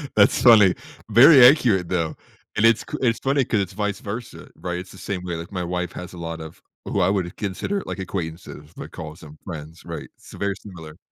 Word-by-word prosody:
That's 100 Hz, -1 st, +4 dB
funny. 105 Hz, -7 st, +7 dB, 0.3 s
Very 125 Hz, +4 st, +8 dB
accurate, 115 Hz, -, +4 dB
though. 85 Hz, -3 st, -1 dB, 0.4 s
And 110 Hz, -, +3 dB
it's 115 Hz, -1 st, +5 dB
c -, -, -6 dB
it's 115 Hz, -3 st, +1 dB
funny 135 Hz, -1 st, +1 dB
'cause 110 Hz, -, 0 dB
it's 95 Hz, -1 st, -5 dB
vice 105 Hz, -1 st, -2 dB
versa, 110 Hz, +4 st, -7 dB
right? 90 Hz, -1 st, -4 dB
It's 90 Hz, -, -10 dB
the 95 Hz, -, -13 dB
same 95 Hz, -2 st, -4 dB
way, 90 Hz, -2 st, -4 dB
like, 85 Hz, +4 st, -7 dB
my 90 Hz, -2 st, -3 dB
wife 90 Hz, 0 st, -3 dB
has 90 Hz, 0 st, -8 dB
a -, -, -10 dB
lot 85 Hz, -1 st, -6 dB
of 80 Hz, +1 st, -11 dB, 0.2 s
who 100 Hz, -, -1 dB
I 90 Hz, -, +3 dB
would 95 Hz, -3 st, -1 dB
consider, 110 Hz, -, -3 dB
like, -, -, -6 dB
acquaintances, 80 Hz, -4 st, -6 dB
but -, -, -9 dB
calls 80 Hz, +2 st, -9 dB
them 75 Hz, 0 st, -13 dB
friends, 80 Hz, -2 st, -8 dB
right? -, -, -7 dB
It's -, -, -16 dB
very 100 Hz, -1 st, -2 dB
similar. 80 Hz, -4 st, -11 dB
95 Hz, 215 wpm, -23 LUFS, 85-105 Hz, 0.4 s, Very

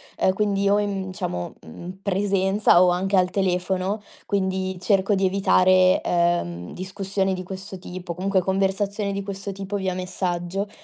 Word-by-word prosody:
ehm, 190 Hz, -, +2 dB
quindi 200 Hz, 0 st, +1 dB
o 205 Hz, +1 st, +4 dB
in 195 Hz, -2 st, -2 dB
diciamo 90 Hz, -, -4 dB
mhmm, 175 Hz, -, -9 dB
presenza 195 Hz, -1 st, +3 dB
o 185 Hz, -, +6 dB
anche 190 Hz, +2 st, +1 dB
al 180 Hz, -1 st, +3 dB
telefono, 190 Hz, +2 st, 0 dB, 0.2 s
quindi 190 Hz, -1 st, -1 dB
cerco 195 Hz, +1 st, +2 dB
di 195 Hz, 0 st, +1 dB
evitare, 185 Hz, -1 st, +4 dB
ehm, 170 Hz, -, 0 dB
discussioni 190 Hz, +1 st, -2 dB
di 185 Hz, 0 st, -4 dB
questo 190 Hz, +1 st, -7 dB
tipo, 180 Hz, -1 st, -7 dB
comunque 190 Hz, +2 st, +1 dB
conversazioni 195 Hz, +2 st, 0 dB
di 200 Hz, 0 st, -2 dB
questo 200 Hz, 0 st, -5 dB
tipo 195 Hz, +1 st, -5 dB
via 190 Hz, -2 st, -1 dB
messaggio, 180 Hz, +1 st, -3 dB
190 Hz, 150 wpm, -24 LUFS, 185-195 Hz, 0.2 s, o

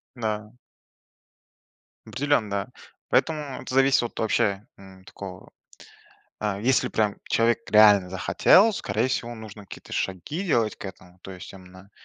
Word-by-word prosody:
Да. 110 Hz, -1 st, -4 dB, 1.5 s
Определенно. 115 Hz, -7 st, -1 dB, 0.4 s
Поэтому 150 Hz, -4 st, 0 dB
это -, -, -7 dB
зависит 135 Hz, -1 st, +4 dB
от 120 Hz, -, -6 dB
вообще, 105 Hz, -2 st, 0 dB
м, 95 Hz, -1 st, -15 dB
такого. 95 Hz, -1 st, -10 dB, 0.9 s
Э, 105 Hz, -2 st, -2 dB
если 130 Hz, +3 st, +2 dB
прям 105 Hz, -2 st, 0 dB
человек 115 Hz, 0 st, +2 dB
реально 105 Hz, -3 st, +6 dB
захотел, 95 Hz, -, +4 dB
скорее 110 Hz, -, -1 dB
всего, 120 Hz, -2 st, -3 dB
нужно 110 Hz, -2 st, -11 dB
какие-то -, -, -11 dB
шаги 95 Hz, -, -3 dB
делать 115 Hz, -, +1 dB
к -, -, -9 dB
этому, 90 Hz, -1 st, -12 dB
то 95 Hz, -, -9 dB
есть, 90 Hz, -1 st, -10 dB
именно, 95 Hz, 0 st, -15 dB
105 Hz, 130 wpm, -25 LUFS, 95-125 Hz, 1.5 s, реально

